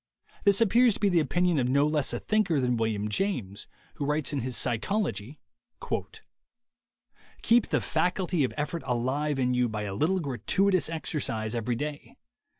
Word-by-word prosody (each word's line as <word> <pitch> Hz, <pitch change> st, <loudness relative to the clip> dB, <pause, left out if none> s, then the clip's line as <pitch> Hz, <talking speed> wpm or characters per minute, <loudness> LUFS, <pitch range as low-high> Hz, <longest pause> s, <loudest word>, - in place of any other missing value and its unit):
This 200 Hz, +1 st, +4 dB
appears 230 Hz, +1 st, +4 dB
to -, -, -7 dB
be 205 Hz, -, +3 dB
the 175 Hz, -3 st, +3 dB
opinion 170 Hz, +2 st, +1 dB
of 125 Hz, -1 st, 0 dB
no 140 Hz, +2 st, +3 dB
less 150 Hz, -2 st, +1 dB
a -, -, -2 dB
thinker 215 Hz, -8 st, +1 dB
than 125 Hz, -1 st, +1 dB
William 110 Hz, -2 st, -1 dB
James, 105 Hz, -, -2 dB, 0.3 s
who 140 Hz, -, -2 dB
writes 150 Hz, 0 st, -1 dB
in 140 Hz, -, 0 dB
his 125 Hz, 0 st, -2 dB
Psychology: 135 Hz, -, -1 dB, 2.0 s
"Keep 235 Hz, 0 st, +4 dB
the -, -, 0 dB
faculty 180 Hz, +1 st, 0 dB
o£ -, -, -10 dB
effort 150 Hz, +3 st, -2 dB
alive 135 Hz, +4 st, -1 dB
in 125 Hz, -1 st, +1 dB
you 125 Hz, -1 st, +1 dB
by 110 Hz, -1 st, -4 dB
a 100 Hz, -2 st, -4 dB
little 165 Hz, -, +1 dB
gratuitous 170 Hz, -, +1 dB
exercise 130 Hz, -8 st, -2 dB
every 120 Hz, +1 st, -1 dB
day. 145 Hz, +3 st, -6 dB
145 Hz, 160 wpm, -28 LUFS, 120-180 Hz, 2.0 s, This